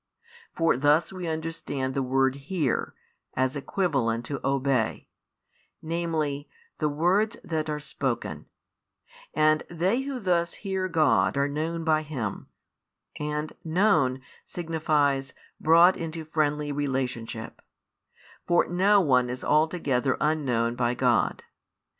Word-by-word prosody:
For 165 -6 +2
thus 150 +6 +3
we 180 -2 -5
understand 160 -4 -3
the 135 - 0
word 130 0 +2
"hear," 140 0 -2 0.4
as 130 +1 +1
equivalent 135 -7 -1
to 140 -2 -4
|100 - - -25
"obey," 135 -4 0 0.7
namely, 160 -3 -2 0.3
the 150 - +1
words 185 +9 +1
that 160 -2 -2
are 150 0 -2
spoken: 135 -4 -4 0.9
and 155 0 +4
they 185 +9 0
who 270 -1 -4
thus 175 -4 +1
hear 190 -2 -2
God 160 -4 +2
are 140 0 +2
known 160 +3 -3
by 155 -1 +2
Him, 130 -10 -5 0.7
and 150 +1 -3
"known" 160 -7 +2 0.2
signifies 150 -5 0 0.2
"brought 170 +3 +6
into 165 -1 -5
friendly 150 -1 0
relationship:" 130 -5 -3 0.9
for 175 0 +4
no 195 +3 +4
one 125 -6 +3
is 125 +1 -5
altogether 150 -4 +1
unknown 130 -7 +1
by 120 0 0
God. 120 -2 +1
150 Hz, 115 wpm, -26 LUFS, 135-165 Hz, 0.9 s, brought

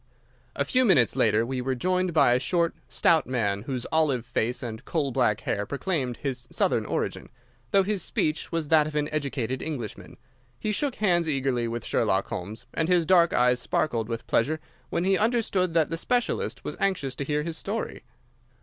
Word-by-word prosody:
A - - 0
few 255 0 +3
minutes 165 - +4
later 110 +1 +3
we 130 +1 -3
were 130 +1 -1
joined 185 +6 0
by 140 -6 +4
a 125 - +3
short, 170 +4 +1 0.2
stout 165 -2 +3
man 105 -6 0
whose 125 +1 -3
olive 145 -7 +2
face 120 +4 -1
and 110 -2 -6
coal 145 -5 -1
black 120 -5 +1
hair 100 - -1
proclaimed 140 -4 -2
his 125 -3 -4
Southern - - +1
origin, - - -3 0.4
though 195 - +4
his 200 -1 -1
speech 155 0 -1
was 165 -3 -2
that 155 -2 +5
of 155 - -7
an 150 0 0
educated 130 -4 -2
Englishman. 130 -10 -6 0.4
He 215 - -1
shook 270 +5 -1
hands 175 -5 +2
eagerly 135 -4 0
with 115 -1 -4
Sherlock - - +1
Holmes, 105 +6 -6
and 160 - 0
his 175 -2 +3
dark 170 -1 +5
eyes 125 0 +3
sparkled 115 -6 -1
with 115 0 -4
pleasure 155 +7 +1 0.3
when 170 - -1
he 190 0 +3
understood 210 -6 +1
that 160 -2 +3
the 165 - -1
specialist 245 +7 -1
was - - -5
anxious 170 -9 0
to 140 - -4
hear 150 +1 -1
his 165 0 -3
story. 215 +3 -4
150 Hz, 185 wpm, -26 LUFS, 125-175 Hz, 0.4 s, that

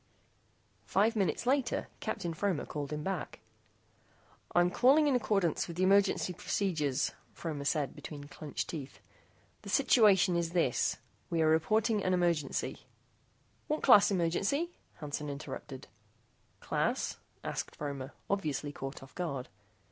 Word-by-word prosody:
Five 215 +4 +3
minutes 205 +2 0
later 265 0 +1
Captain 170 -1 -3
Fromer 185 -1 -1
called 145 -1 -5
him 150 0 -3
back. 190 -3 -4 1.2
"I 175 - +7
am 175 0 +2
calling 275 +8 +5
in 280 - +3
accordance 195 -9 +1
with 170 0 -7
emergency 195 -1 +3
procedures," 160 -8 0 0.2
Fromer 150 -4 -4
said 145 -2 0
between 145 -2 -8
clinched 145 +1 -5
teeth. 145 -5 -7 0.6
"The - - -9
situation 195 -6 +5
is 170 -1 -1
this: 165 -9 +1 0.3
We 165 -1 +1
are - - +4
reporting 205 +7 +2
an 185 0 +2
emergency 170 -5 -1 0.4
" - - -38
"What 305 +1 -1
class 225 -6 +8
emergency?" 200 - 0 0.2
Hansen 150 -1 -5
interrupted. 140 -1 -7 0.7
"Class?" - - -1 0.3
asked - - -4
Fromer, 140 -2 -5 0.2
obviously 150 -7 -1
caught 135 -1 -7
off 135 - -14
guard. 140 -8 -4
170 Hz, 130 wpm, -32 LUFS, 150-200 Hz, 1.2 s, class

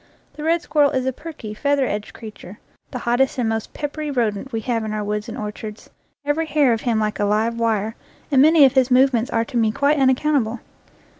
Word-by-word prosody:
The 300 - -8
red 335 +2 +1
squirrel 290 -1 +3
is 260 -1 -1
a 260 - -1
perky, 290 -7 -8
feather 280 +4 +1
edged 210 -3 -4
creature, 215 -3 -11 0.3
the - - -5
hot 240 0 0
test 270 +1 +1
and 245 -3 0
most 225 -1 -3
peppery 300 +1 -5
rodent 240 -2 -2
we 225 -2 -3
have 230 -1 -1
in 215 -1 -4
our 210 -1 -2
woods 210 +1 -3
and - - -7
orchards, 210 0 -7 0.3
every 310 +3 0
hair 285 -5 +3
of 225 - -2
him 230 -3 0
like 215 -1 -2
a - - +1
live 220 +3 0
wire, 220 -1 0 0.4
and 265 -2 +5
many 310 0 +7
of 265 - +3
his 260 -2 +3
movements 255 -1 +3
are 230 -3 0
to 240 - -4
me 220 -2 +2
quite 285 +5 +1
unac 260 -1 +4
countable. 255 -7 0
245 Hz, 225 wpm, -21 LUFS, 220-285 Hz, 0.4 s, many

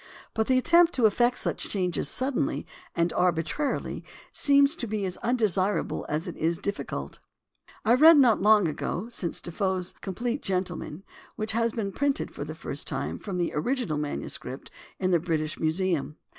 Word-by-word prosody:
But 220 0 0
the 260 - +4
attempt 340 +5 +5
to 245 - +2
effect 240 +4 +3
such - - -3
changes 180 -4 -1
suddenly 260 +1 -1 0.3
and 170 0 +1
arbitrarily 180 - -1 0.3
seems 280 +1 +4
to 240 - -3
be 210 -2 -2
as 185 -1 -4
undesirable 210 -5 0
as 155 +4 -2
it 175 - -5
is 165 +1 0
difficult. 200 +3 -4 0.7
I 230 - +5
read 310 +5 +8
not 245 -8 +5
long 210 -2 +5 0.4
since 180 -7 -2
Defoe's 185 +1 -2
Compleat 235 +7 -3
Gentleman, 180 -2 -3 0.3
which 215 0 -1
has 230 +1 +1
been 205 -4 -2
printed 285 +5 -1
for - - -6
the - - -7
first - - -4
time - - -3
from 195 -3 -5
the 175 -1 -1
original 210 - -1
manuscript 145 -2 -5 0.3
in 185 -1 0
the 175 - +4
British 155 -2 -2
Museum. 160 -2 0
195 Hz, 155 wpm, -27 LUFS, 175-245 Hz, 0.7 s, read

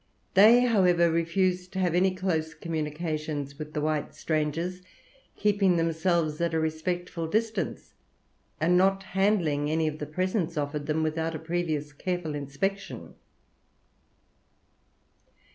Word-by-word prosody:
They, 220 +5 +7
however, 180 -8 +4
refused 180 +2 0
to 190 - -2
have 180 -3 +1
any 185 +1 +3
close 165 -4 -1
communications 155 -2 -3
with 155 0 -7
the 150 - 0
white 155 -1 -1
strangers, 165 +4 -2 0.5
keeping 200 -3 +2
themselves 165 -1 0
at 170 -1 0
a - - +2
respectful 165 +1 -2
distance, 220 +5 -2 0.7
and 170 +3 +3
not 195 +1 +3
handling 185 -7 +1
any 160 0 +1
of 155 0 -4
the 150 - -4
presents 180 0 -1
offered 145 0 -2
them 160 +1 0
without 160 +1 -1
a - - -2
previous 160 -3 -2
careful 175 0 -3
inspection. 145 +8 -4
165 Hz, 125 wpm, -27 LUFS, 155-185 Hz, 0.7 s, They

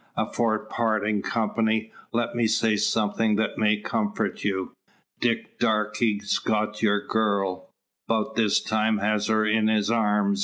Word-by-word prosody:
Afore 115 -2 0
partin' 110 -1 -1
company, 110 0 0 0.2
let 120 0 -1
me 120 -1 +1
say 110 0 +2
somethin' 105 +1 +1
that 110 +1 -1
may 105 -1 +3
comfort 215 - -2
you. 95 -2 -2 0.4
Dick - - -1
Darke's 105 -1 0
got 105 -1 -1
your 105 -2 +2
girl; 100 -4 -1 0.4
'bout 110 -1 0
this 110 -3 +2
time 110 0 0
has 105 0 0
her 110 -1 +2
in 110 0 +2
his 110 0 +1
arms!" 105 -3 +1
110 Hz, 140 wpm, -25 LUFS, 105-110 Hz, 0.4 s, may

